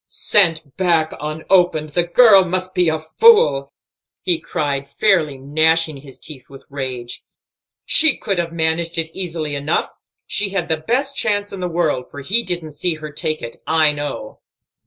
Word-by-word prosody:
"Sent 165 Hz, -8 st, +1 dB
back 165 Hz, -4 st, +1 dB
unopened! 155 Hz, +1 st, 0 dB
The 175 Hz, -, +1 dB
girl 195 Hz, +3 st, +5 dB
must 185 Hz, +1 st, -3 dB
be 180 Hz, -2 st, +2 dB
a 160 Hz, -, -1 dB
fool!" 155 Hz, -, +3 dB, 0.5 s
he 175 Hz, -3 st, +1 dB
cried, 140 Hz, -2 st, -4 dB
fairly 155 Hz, -4 st, 0 dB
gnashing 155 Hz, +3 st, +1 dB
his 135 Hz, -1 st, -13 dB
teeth 145 Hz, -5 st, -10 dB
with 135 Hz, -1 st, -15 dB
rage. 130 Hz, -3 st, -6 dB, 0.6 s
"She 315 Hz, -3 st, +6 dB
could 195 Hz, -3 st, -3 dB
have 170 Hz, -1 st, -3 dB
managed 165 Hz, +1 st, -1 dB
it 165 Hz, 0 st, -1 dB
easily 165 Hz, -5 st, -3 dB
enough; 145 Hz, +3 st, -1 dB, 0.3 s
she 205 Hz, -1 st, 0 dB
had 190 Hz, -3 st, -3 dB
the 160 Hz, -, +1 dB
best 260 Hz, -, -2 dB
chance 205 Hz, -4 st, 0 dB
in 195 Hz, -, -7 dB
the 180 Hz, -, -3 dB
world, 160 Hz, -7 st, -2 dB
for 145 Hz, -, -10 dB
he 205 Hz, -, +2 dB
didn't 175 Hz, -7 st, -5 dB
see 160 Hz, +3 st, 0 dB
her 155 Hz, -1 st, -9 dB
take 155 Hz, +1 st, -3 dB
it, 115 Hz, -, -8 dB
I 155 Hz, -1 st, +4 dB
know." 145 Hz, -1 st, -7 dB
160 Hz, 165 wpm, -18 LUFS, 150-180 Hz, 0.6 s, She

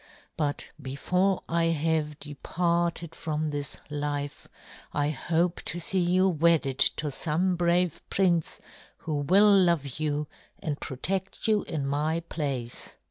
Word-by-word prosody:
But 145 Hz, -2 st, -2 dB
before 180 Hz, +8 st, 0 dB
I 170 Hz, 0 st, +1 dB
have 160 Hz, -2 st, 0 dB
departed 170 Hz, +3 st, -1 dB
from 155 Hz, -2 st, -2 dB
this 145 Hz, -1 st, -1 dB
life, 145 Hz, -1 st, -3 dB, 0.5 s
I 145 Hz, 0 st, +1 dB
hope 170 Hz, +3 st, 0 dB
to 175 Hz, -, -3 dB
see 185 Hz, +3 st, +2 dB
you 180 Hz, +2 st, +3 dB
wedded 160 Hz, -5 st, +2 dB
to 150 Hz, -1 st, +2 dB
some 175 Hz, +6 st, 0 dB
brave 175 Hz, -1 st, +1 dB
prince 175 Hz, -4 st, +1 dB, 0.4 s
who 155 Hz, -2 st, -3 dB
will 200 Hz, +8 st, +5 dB
love 170 Hz, -8 st, +2 dB
you 150 Hz, -1 st, 0 dB, 0.3 s
and 150 Hz, -2 st, -4 dB
protect 190 Hz, -, -2 dB
you 215 Hz, -2 st, +3 dB
in 150 Hz, -4 st, -3 dB
my 150 Hz, +4 st, 0 dB
place." 140 Hz, -8 st, -4 dB
160 Hz, 130 wpm, -28 LUFS, 145-175 Hz, 0.5 s, will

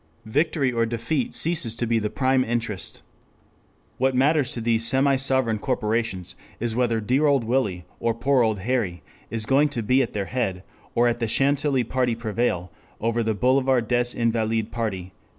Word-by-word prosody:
Victory 145 Hz, +3 st, +1 dB
or 115 Hz, -1 st, 0 dB
defeat 120 Hz, +4 st, -2 dB
ceases 155 Hz, -9 st, +2 dB
to 120 Hz, -, -2 dB
be 115 Hz, 0 st, +1 dB
the 105 Hz, -1 st, -2 dB
prime 130 Hz, +1 st, +1 dB
interest. 115 Hz, -4 st, -3 dB, 1.0 s
What 130 Hz, 0 st, +2 dB
matters 140 Hz, +1 st, +2 dB
to -, -, -4 dB
these 115 Hz, 0 st, +2 dB
semi 135 Hz, +3 st, +3 dB
sovereign 130 Hz, -4 st, +1 dB
corporations 110 Hz, -6 st, -2 dB, 0.2 s
is 115 Hz, -1 st, -2 dB
whether 120 Hz, -2 st, +1 dB
dear 130 Hz, +8 st, +1 dB
old 140 Hz, -4 st, +3 dB
Willie 110 Hz, -7 st, -1 dB
or 115 Hz, -1 st, 0 dB
poor 135 Hz, +2 st, +2 dB
old 110 Hz, -4 st, 0 dB
Harry 95 Hz, -, -2 dB, 0.3 s
is 115 Hz, -2 st, -1 dB
going 140 Hz, +4 st, +3 dB
to 120 Hz, -5 st, -3 dB
be 130 Hz, +5 st, +3 dB
at 125 Hz, -, -2 dB
their 100 Hz, -2 st, -2 dB
head, 95 Hz, -6 st, -2 dB, 0.3 s
or 120 Hz, 0 st, +3 dB
the 115 Hz, -1 st, -3 dB
Chantilly 140 Hz, +2 st, +2 dB
party 125 Hz, 0 st, 0 dB
prevail 110 Hz, -6 st, -2 dB, 0.3 s
over 115 Hz, +1 st, 0 dB
the 110 Hz, -1 st, 0 dB
Boulevard 130 Hz, +1 st, +2 dB
des 120 Hz, +1 st, +2 dB
Invalides 115 Hz, -1 st, 0 dB
party." 95 Hz, -6 st, -4 dB
120 Hz, 170 wpm, -24 LUFS, 110-130 Hz, 1.0 s, semi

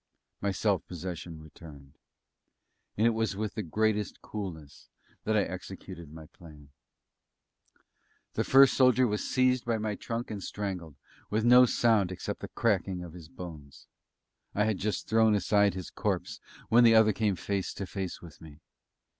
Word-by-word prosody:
My 100 Hz, -, 0 dB
self 95 Hz, -2 st, 0 dB
possession 85 Hz, -2 st, -7 dB
returned; 75 Hz, -3 st, -14 dB, 1.0 s
and 110 Hz, -, +3 dB
it 115 Hz, -, +5 dB
was 110 Hz, -2 st, -1 dB
with 105 Hz, +1 st, -3 dB
the 110 Hz, -, -3 dB
greatest 105 Hz, +3 st, -1 dB
coolness 85 Hz, -9 st, -8 dB, 0.4 s
that 110 Hz, 0 st, +2 dB
I 100 Hz, -, +3 dB
executed 90 Hz, -3 st, -8 dB
my 80 Hz, 0 st, -10 dB
plan. 75 Hz, -3 st, -16 dB, 1.6 s
The -, -, 0 dB
first 135 Hz, 0 st, +6 dB
soldier 130 Hz, -1 st, +4 dB
was 105 Hz, -2 st, -1 dB
seized 130 Hz, -1 st, +2 dB
by 115 Hz, -1 st, 0 dB
my 105 Hz, -1 st, -2 dB
trunk 115 Hz, +3 st, -5 dB
and 105 Hz, -2 st, -5 dB
strangled, 90 Hz, -7 st, -5 dB, 0.3 s
with 110 Hz, +2 st, 0 dB
no 125 Hz, +1 st, +7 dB
sound 110 Hz, -6 st, +2 dB
except 90 Hz, -, -5 dB
the -, -, -6 dB
cracking 95 Hz, -5 st, -1 dB
of 85 Hz, -2 st, -10 dB
his 85 Hz, -3 st, -11 dB
bones. 80 Hz, -6 st, -10 dB, 0.7 s
I 105 Hz, -, +2 dB
had 110 Hz, -3 st, 0 dB
just 105 Hz, +1 st, -2 dB
thrown 110 Hz, -1 st, +4 dB
aside 100 Hz, -1 st, +2 dB
his 95 Hz, -3 st, -7 dB
corpse -, -, -2 dB, 0.3 s
when 120 Hz, +2 st, +5 dB
the 115 Hz, -1 st, +7 dB
other 110 Hz, -1 st, +5 dB
came 105 Hz, -1 st, 0 dB
face 100 Hz, +2 st, -3 dB
to 100 Hz, -, -4 dB
face 95 Hz, -1 st, -5 dB
with 80 Hz, -6 st, -13 dB
me. 80 Hz, -2 st, -13 dB
100 Hz, 160 wpm, -29 LUFS, 85-110 Hz, 1.6 s, no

